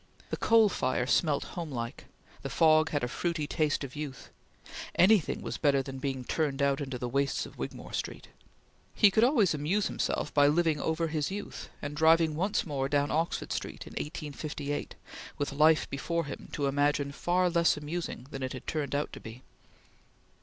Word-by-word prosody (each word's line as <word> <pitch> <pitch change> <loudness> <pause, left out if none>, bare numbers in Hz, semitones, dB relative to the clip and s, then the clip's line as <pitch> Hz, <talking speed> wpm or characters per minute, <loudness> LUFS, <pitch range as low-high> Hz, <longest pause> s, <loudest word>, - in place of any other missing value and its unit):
The - - -1
coal 225 -2 +5
fire 130 -9 0
smelt 145 +2 +2
homelike; 135 -9 -5 0.4
the - - -5
fog 155 -1 +4
had 145 -3 -1
a - - +1
fruity 165 +4 -2
taste 150 -1 0
of 135 0 -7
youth; 145 -3 -7 0.6
anything 190 -1 +4
was - - -4
better 140 -3 +3
than 135 0 -7
being 130 -1 -3
turned 145 +1 -1
out 140 0 +2
into 135 -2 -4
the 125 - -3
wastes 140 +2 0
of - - -13
Wigmore - - -6
Street. - - -4 0.7
He 205 - +6
could 220 +3 +3
always 240 - +4
amuse 160 +8 0
himself - - -2
by 145 -1 +5
living 155 0 +2
over 160 +1 0
his 150 -2 -1
youth, 200 +1 -6
and 145 0 -4
driving 160 +1 +4
once 195 +6 0
more 135 -4 -2
down 145 0 +1
Oxford 165 +2 -1
Street - - -5
in - - -11
1858, 150 -1 -5 0.4
with 145 -1 -2
life 155 +2 +4
before 165 +4 -2
him 140 - -8
to 145 - -1
imagine 145 0 +1
far 180 +5 +1
less 170 -2 +3
amusing 150 -3 -5
than 135 - -6
it 130 -1 -3
had 130 - -8
turned 145 -3 -2
out 145 - -2
to - - -7
be. 115 +3 -10
150 Hz, 180 wpm, -30 LUFS, 140-165 Hz, 0.7 s, He